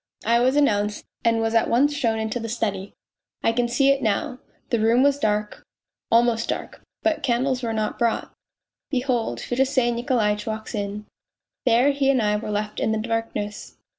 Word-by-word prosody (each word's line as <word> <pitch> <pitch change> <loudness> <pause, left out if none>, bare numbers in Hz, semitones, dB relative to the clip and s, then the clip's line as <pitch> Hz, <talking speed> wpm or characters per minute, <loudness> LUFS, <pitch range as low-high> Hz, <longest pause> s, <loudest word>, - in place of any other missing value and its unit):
I 235 +2 +4
was 255 +3 +2
announced, 210 -8 +1 0.2
and 230 -1 +2
was 225 0 0
at 225 - +3
once 280 +5 +3
shown 235 -6 0
into 220 +2 -2
the 230 0 -5
study. 205 -4 -3 0.5
I - - +3
can 240 +1 0
see 270 +3 +2
it 275 0 +1
now; 225 +3 -1 0.3
the 235 - +2
room 230 +4 +4
was 285 0 +3
dark, 210 -4 -1 0.5
almost 230 0 +3
dark, - - -4 0.2
but 325 -1 +1
candles 255 0 0
were 230 -2 -2
not 215 -1 -2
brought. 235 -1 0 0.6
Behold, 250 - -1
Fedosey 260 - +1
Nikolaitch 235 -4 0
walks 220 +1 -5
in. 205 0 -4 0.6
There 245 +4 +5
he 275 -1 +1
and 270 -2 +3
I 210 -2 +1
were 215 - -5
left 210 0 -3
in - - +1
the 220 - 0
darkness. 220 -2 -4
230 Hz, 175 wpm, -23 LUFS, 215-255 Hz, 0.6 s, There